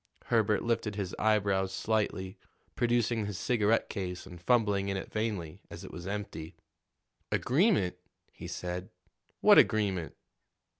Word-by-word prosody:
Herbert 110 -2 +2
lifted 115 -3 -1
his 100 -3 -3
eyebrows 100 -3 +2
slightly, 100 -2 -1 0.4
producing 120 -2 +1
his 100 -3 -4
cigarette 115 0 +2
case 90 -2 -5
and 90 -2 -11
fumbling 105 -3 +2
in 100 - -1
it 95 - -6
vainly, 105 -8 -3
as - - -9
it - - -9
was 85 +1 -8
empty. 100 -6 -5 0.8
"Agreement?" 135 - +2 0.3
he - - -9
said. 90 +1 -5 0.5
"What - - +8
agreement?" 95 -6 +1
100 Hz, 130 wpm, -30 LUFS, 95-110 Hz, 0.8 s, What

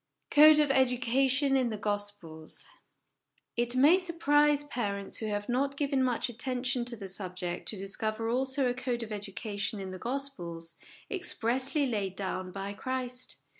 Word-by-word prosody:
Code 305 0 +9
of 300 -2 +4
Education 265 +2 +3
in 255 -3 +2
the 215 - -3
Gospels. 205 -6 -4 0.9
It 240 +1 +1
may 295 +8 +6
surprise 295 -4 +3
parents 205 -8 -3
who 220 - -3
have 205 -1 -2
not 275 +3 0
given 275 -2 +1
much 250 -2 +1
attention 250 +1 -2
to 240 0 -3
the 200 -3 -7
subject 180 -2 -4
to 215 - +2
discover 215 +3 -3
also 265 +3 +1
a 245 - +1
code 245 -1 -2
of 225 - -8
education 205 0 -4
in 190 -1 -5
the 185 - -7
Gospels, 175 -11 -4 0.3
expressly 275 - 0
laid 205 -7 -2
down 185 -1 -3
by 195 +1 -5
Christ. 255 +2 -3
240 Hz, 150 wpm, -30 LUFS, 200-270 Hz, 0.9 s, Code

